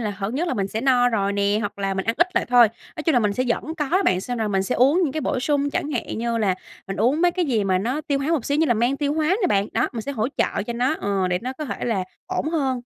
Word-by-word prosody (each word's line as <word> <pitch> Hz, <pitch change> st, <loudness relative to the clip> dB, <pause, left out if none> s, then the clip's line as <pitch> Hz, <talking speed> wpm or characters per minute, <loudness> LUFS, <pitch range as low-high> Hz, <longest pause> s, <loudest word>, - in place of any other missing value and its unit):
là, 215 Hz, -3 st, -1 dB
hở 195 Hz, +1 st, -4 dB
nhất 315 Hz, +8 st, -1 dB
là -, -, -1 dB
mình 195 Hz, -4 st, -1 dB
sẽ 220 Hz, -, -3 dB
no 250 Hz, -1 st, +4 dB
rồi 200 Hz, -4 st, 0 dB
nè, 200 Hz, 0 st, +1 dB
hoặc 205 Hz, -1 st, -4 dB
là 195 Hz, -1 st, -1 dB
mình 190 Hz, 0 st, -2 dB
ăn 225 Hz, -, 0 dB
ít 345 Hz, -, +5 dB
lại -, -, +2 dB
thôi. 245 Hz, -2 st, +6 dB, 0.3 s
Nói 310 Hz, -, -4 dB
chung 320 Hz, -, +2 dB
là 245 Hz, -, +4 dB
mình 210 Hz, -3 st, +1 dB
sẽ 255 Hz, +5 st, -1 dB
vẫn 315 Hz, +7 st, -2 dB
có 295 Hz, -3 st, -2 dB
đó 370 Hz, +6 st, +2 dB
bạn, 185 Hz, -, +2 dB
xem 245 Hz, +5 st, -4 dB
rồi 220 Hz, -2 st, 0 dB
mình 195 Hz, -1 st, +1 dB
sẽ -, -, -2 dB
uống 275 Hz, +9 st, +4 dB
những 290 Hz, -6 st, 0 dB
cái 310 Hz, -, -2 dB
bổ 275 Hz, -3 st, -1 dB
sung, 285 Hz, +1 st, +1 dB
chẳng 290 Hz, -, -2 dB
hạn 250 Hz, -5 st, -3 dB
như 230 Hz, 0 st, -1 dB
là 200 Hz, -4 st, +2 dB, 0.3 s
mình 195 Hz, -, -4 dB
uống 250 Hz, +9 st, +2 dB
mấy 355 Hz, -, +5 dB
cái 360 Hz, 0 st, 0 dB
gì 230 Hz, -9 st, 0 dB
mà 185 Hz, -1 st, +2 dB
nó 245 Hz, +10 st, -1 dB
tiêu 290 Hz, -2 st, -1 dB
hóa 275 Hz, +2 st, -2 dB
một 320 Hz, -8 st, +1 dB
xíu, 285 Hz, -, 0 dB
như 320 Hz, -, +3 dB
là 240 Hz, -, +3 dB
men 240 Hz, +5 st, +1 dB
tiêu 290 Hz, 0 st, 0 dB
hóa 310 Hz, -1 st, 0 dB, 0.2 s
nè -, -, +4 dB
bạn. 200 Hz, -, +1 dB
Đó, -, -, +1 dB
mình 230 Hz, -, -4 dB
sẽ 280 Hz, -, -4 dB
hỗ 225 Hz, -2 st, -1 dB
trợ -, -, 0 dB
cho 235 Hz, -, -2 dB
nó, 250 Hz, +5 st, +1 dB
ờ, 195 Hz, -2 st, 0 dB
để 180 Hz, 0 st, 0 dB
nó 255 Hz, +2 st, -3 dB
có 305 Hz, +4 st, -6 dB
thể -, -, -4 dB
là 215 Hz, -6 st, 0 dB, 0.2 s
ổn 305 Hz, -, -2 dB
hơn. 270 Hz, -6 st, 0 dB
245 Hz, 330 wpm, -23 LUFS, 205-290 Hz, 0.3 s, thôi